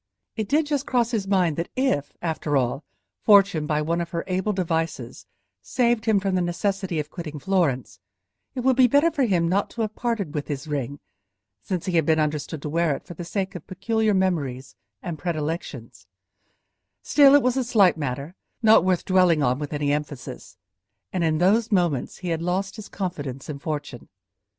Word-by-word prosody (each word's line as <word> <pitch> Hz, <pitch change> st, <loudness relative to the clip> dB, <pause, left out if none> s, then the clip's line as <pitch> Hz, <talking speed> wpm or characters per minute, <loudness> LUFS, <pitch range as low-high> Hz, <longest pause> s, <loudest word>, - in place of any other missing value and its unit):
It 220 Hz, -3 st, -3 dB
did 305 Hz, +2 st, +3 dB
just 290 Hz, -2 st, -2 dB
cross 240 Hz, -1 st, +1 dB
his 210 Hz, -5 st, -1 dB
mind 180 Hz, -6 st, +2 dB
that 170 Hz, -, -3 dB
if, 260 Hz, -, 0 dB
after 155 Hz, -3 st, 0 dB
all, 130 Hz, +3 st, -1 dB, 0.4 s
Fortune, 195 Hz, -7 st, +5 dB
by 150 Hz, 0 st, 0 dB
one 170 Hz, +2 st, 0 dB
of 170 Hz, -, -4 dB
her 170 Hz, -1 st, -3 dB
able 190 Hz, +2 st, -1 dB
devices, 165 Hz, -4 st, -3 dB, 0.3 s
saved 240 Hz, -3 st, +1 dB
him 220 Hz, -3 st, +3 dB
from 195 Hz, -1 st, -1 dB
the 185 Hz, -, +2 dB
necessity 180 Hz, 0 st, -1 dB
of 150 Hz, 0 st, -5 dB
quitting 160 Hz, -4 st, -6 dB
Florence, 165 Hz, -7 st, 0 dB, 0.6 s
it 255 Hz, -, -2 dB
would 260 Hz, +1 st, +3 dB
be 255 Hz, -1 st, +6 dB
better 285 Hz, +7 st, +4 dB
for 285 Hz, -4 st, +1 dB
him 175 Hz, -6 st, +2 dB
not 195 Hz, +4 st, +1 dB
to 235 Hz, -, -5 dB
have 215 Hz, -1 st, -2 dB
parted 225 Hz, -11 st, -2 dB
with 150 Hz, -3 st, -3 dB
his 145 Hz, -1 st, -5 dB
ring, 145 Hz, -1 st, -3 dB, 0.6 s
since 185 Hz, -2 st, -3 dB
he 180 Hz, -3 st, 0 dB
had 160 Hz, -, +3 dB
been 160 Hz, -1 st, +3 dB
understood 150 Hz, 0 st, -2 dB
to -, -, -3 dB
wear 165 Hz, -1 st, +1 dB
it -, -, -10 dB
for -, -, -9 dB
the 175 Hz, -, -7 dB
sake 195 Hz, +2 st, -3 dB
of 180 Hz, -5 st, -9 dB
peculiar 215 Hz, +2 st, 0 dB
memories 145 Hz, -9 st, -1 dB, 0.3 s
and 165 Hz, -3 st, -5 dB
predilections; 150 Hz, -, -4 dB, 1.0 s
still, 285 Hz, -1 st, +6 dB
it 285 Hz, -, +5 dB
was 255 Hz, 0 st, +2 dB
a 265 Hz, -, +1 dB
slight 210 Hz, -6 st, +4 dB
matter, 140 Hz, +1 st, -4 dB, 0.3 s
not 220 Hz, -5 st, +7 dB
worth 185 Hz, -2 st, +1 dB
dwelling 180 Hz, -5 st, +4 dB
on 125 Hz, +1 st, +1 dB
with 145 Hz, -1 st, -5 dB
any 145 Hz, -1 st, 0 dB
emphasis, 145 Hz, -3 st, -6 dB, 0.6 s
and 180 Hz, -, 0 dB
in 160 Hz, -1 st, +2 dB
those 210 Hz, +7 st, +2 dB
moments 175 Hz, -9 st, 0 dB
he 180 Hz, -, -5 dB
had 165 Hz, -1 st, -1 dB
lost 185 Hz, +3 st, -1 dB
his 215 Hz, -2 st, -9 dB
confidence 145 Hz, -9 st, -5 dB
in 145 Hz, -2 st, -5 dB
fortune. 145 Hz, -5 st, -5 dB
175 Hz, 190 wpm, -24 LUFS, 150-205 Hz, 1.0 s, not